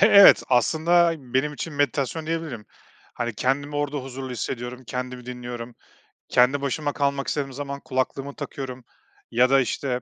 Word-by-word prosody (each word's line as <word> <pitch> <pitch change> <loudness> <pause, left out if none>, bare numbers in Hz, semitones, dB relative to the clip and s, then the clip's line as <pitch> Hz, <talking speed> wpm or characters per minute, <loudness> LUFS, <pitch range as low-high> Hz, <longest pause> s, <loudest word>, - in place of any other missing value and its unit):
Evet, 200 -2 +9
aslında 165 +7 +4
benim 135 +2 -1
için 165 +2 -5
meditasyon 145 +2 0
diyebilirim. 160 -10 -3 0.5
Hani, 120 -2 -3
kendimi 145 +4 -1
orada 145 0 -1
huzurlu 130 -1 -6
hissediyorum, 125 +1 -5
kendimi 125 0 -5
dinliyorum. 120 -1 -6 0.6
Kendi 130 +3 +4
başıma 145 +1 -1
kalmak 140 -1 0
istediğim 135 -3 -2
zaman 140 0 -5
kulaklığımı 135 +2 -2
takıyorum 130 -3 -6 0.5
ya 125 +2 +4
da, 135 - +6
işte, 125 0 -2
135 Hz, 140 wpm, -24 LUFS, 125-145 Hz, 0.6 s, Evet